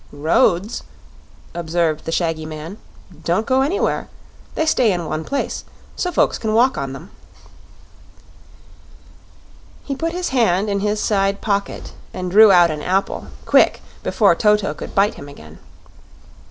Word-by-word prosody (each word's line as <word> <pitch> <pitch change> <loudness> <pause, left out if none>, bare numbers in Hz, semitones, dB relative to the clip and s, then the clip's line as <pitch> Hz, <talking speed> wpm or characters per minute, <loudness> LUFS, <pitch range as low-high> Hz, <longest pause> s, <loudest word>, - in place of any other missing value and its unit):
"Roads," 170 +7 +1 0.7
observed 165 -2 -1
the 165 - -3
shaggy 165 -2 -1
man, 155 +6 -8 0.4
"don't 180 +6 0
go 260 0 +2
anywhere. 305 +9 -1 0.5
They 315 - 0
stay 255 -8 +3
in 175 -2 -2
one 155 0 -3
place, 275 - -3 0.3
so 360 - -2
folks - - +1
can 220 -1 -1
walk 250 +3 +4
on 135 -1 -4
them." 160 +8 -11 2.7
He 275 - -4
put 330 +4 -3
his 360 0 -2
hand 210 -6 +1
in 200 - 0
his 210 +1 -1
side 200 -1 0
pocket 200 -2 -3 0.2
and 180 -1 -4
drew 215 +2 +8
out 175 -3 +5
an 150 -1 -5
apple 190 +4 -1 0.2
quick, - - +3 0.2
before 205 -6 +3
Toto 210 +2 +2
could - - -9
bite 200 +2 +3
him 140 - -11
again. 80 - -14
195 Hz, 140 wpm, -20 LUFS, 165-220 Hz, 2.7 s, drew